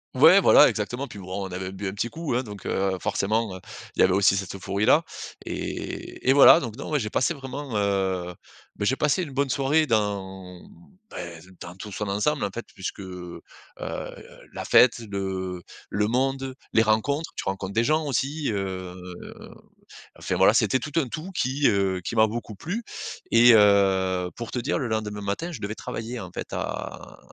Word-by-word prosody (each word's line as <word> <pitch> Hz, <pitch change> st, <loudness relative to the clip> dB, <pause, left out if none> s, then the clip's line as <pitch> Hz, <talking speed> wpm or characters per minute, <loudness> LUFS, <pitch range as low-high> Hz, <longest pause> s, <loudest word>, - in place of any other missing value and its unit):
Ouais 160 Hz, +9 st, +8 dB
voilà 150 Hz, -, +7 dB
exactement 120 Hz, +5 st, -3 dB
et -, -, -12 dB
puis 105 Hz, -, -9 dB
bon, 95 Hz, +1 st, -5 dB
on -, -, -12 dB
avait 95 Hz, +1 st, -4 dB
bu 100 Hz, +1 st, -6 dB
un -, -, -6 dB
petit 105 Hz, +3 st, -2 dB
coup, 160 Hz, +1 st, -4 dB
hein, 125 Hz, -, +1 dB
donc, 105 Hz, -6 st, -10 dB
heu, 95 Hz, -1 st, 0 dB
forcément, 110 Hz, +1 st, 0 dB
heu, -, -, -8 dB, 0.4 s
il -, -, -10 dB
y -, -, +7 dB
avait 95 Hz, -, +4 dB
aussi 95 Hz, 0 st, +4 dB
cette 95 Hz, 0 st, -4 dB
euphorie-là 100 Hz, -, +2 dB, 0.4 s
et -, -, -5 dB
et -, -, +7 dB
voilà 140 Hz, +4 st, +8 dB
donc 115 Hz, -3 st, -6 dB
non, 140 Hz, -, -6 dB
moi, 155 Hz, -, +1 dB
j'ai 110 Hz, -6 st, -2 dB
passé 130 Hz, +9 st, +1 dB
vraiment, 135 Hz, -3 st, -6 dB
heu, 95 Hz, -3 st, 0 dB, 0.4 s
bah, 105 Hz, -, -2 dB
j'ai 130 Hz, -, +2 dB
passé 150 Hz, +5 st, +1 dB
une 150 Hz, -, -7 dB
bonne 140 Hz, +1 st, 0 dB
soirée 145 Hz, +4 st, +2 dB
dans, 95 Hz, -5 st, -2 dB, 0.5 s
bah, -, -, -8 dB, 0.4 s
dans 85 Hz, -, -9 dB
tout 105 Hz, +2 st, -9 dB
son 105 Hz, +2 st, -4 dB
ensemble 105 Hz, +9 st, 0 dB
en -, -, -2 dB
fait 120 Hz, +4 st, -6 dB
puisque, 95 Hz, +1 st, -6 dB
heu, 90 Hz, -2 st, -8 dB, 1.1 s
la -, -, -5 dB
fête, 125 Hz, -1 st, +5 dB
le 95 Hz, -2 st, -3 dB, 0.3 s
le 105 Hz, +1 st, 0 dB
monde, 135 Hz, +2 st, -1 dB, 0.2 s
les 115 Hz, -, +4 dB
rencontres. 140 Hz, +9 st, 0 dB
Tu -, -, -4 dB
rencontres 95 Hz, 0 st, -3 dB
des 115 Hz, -, +2 dB
gens 155 Hz, +4 st, +1 dB
aussi, 145 Hz, +2 st, -1 dB
heu, 95 Hz, -3 st, -4 dB, 1.3 s
enfin, -, -, -2 dB
voilà, -, -, +5 dB
c'était 130 Hz, -, +3 dB
tout 150 Hz, -, -6 dB
un 140 Hz, -, -1 dB
tout 155 Hz, +9 st, -6 dB
qui, 140 Hz, -4 st, +1 dB
heu, 95 Hz, -2 st, +1 dB
qui 115 Hz, -, -4 dB
m'a 110 Hz, 0 st, +6 dB
beaucoup 110 Hz, -1 st, -6 dB
plu 180 Hz, -, -4 dB, 0.5 s
et 120 Hz, +1 st, +8 dB
heu, 95 Hz, -3 st, +4 dB
pour 115 Hz, -1 st, -6 dB
te 125 Hz, -, -2 dB
dire, 120 Hz, -, -1 dB
le 125 Hz, -, -2 dB
lendemain 105 Hz, -2 st, -2 dB
matin 100 Hz, -, -3 dB
je -, -, -8 dB
devais 105 Hz, +1 st, -4 dB
travailler 115 Hz, +3 st, -5 dB
en 95 Hz, -, -7 dB
fait -, -, -7 dB
à -, -, -5 dB
110 Hz, 195 wpm, -25 LUFS, 95-135 Hz, 1.3 s, Ouais